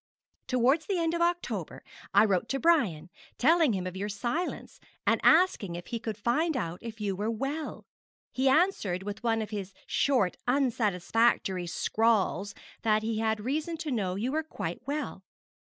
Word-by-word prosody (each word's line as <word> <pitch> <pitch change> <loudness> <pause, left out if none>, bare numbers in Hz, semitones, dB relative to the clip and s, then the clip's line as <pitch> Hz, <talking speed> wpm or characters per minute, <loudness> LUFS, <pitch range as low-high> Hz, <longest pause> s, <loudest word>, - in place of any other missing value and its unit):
'Towards 260 +5 +2
the 390 - 0
end 330 -1 0
of 340 - -1
October 345 0 -1 0.3
I - - +6
wrote 200 +1 0
to 270 - -1
Brian, 215 - +2 0.3
telling 320 -1 +4
him 185 -2 -2
of 185 0 -5
your 200 +2 -3
silence, 240 - -3 0.3
and - - +2
asking 315 - +4
if 175 0 -7
he 235 - -4
could 220 -2 -4
find 290 +8 +1
out 175 -6 -3
if 225 -1 -8
you 200 -2 -1
were 210 +4 -2
well. 275 +7 -4 0.5
He 265 +1 +2
answered 265 - +2
with 205 0 -6
one 225 -2 +1
of 215 - -9
his 195 -2 -5
short, 250 -10 +1
unsatisfactory 225 -6 +1
scrawls 205 +1 +1 0.3
that 215 -1 +2
he 220 0 -1
had 220 -1 0
reason 305 +8 -2
to 315 -2 -4
know 195 -7 -1
you 230 +7 -2
were 310 +2 0
quite 315 - -5
well. 295 +2 -3
230 Hz, 170 wpm, -29 LUFS, 200-295 Hz, 0.5 s, I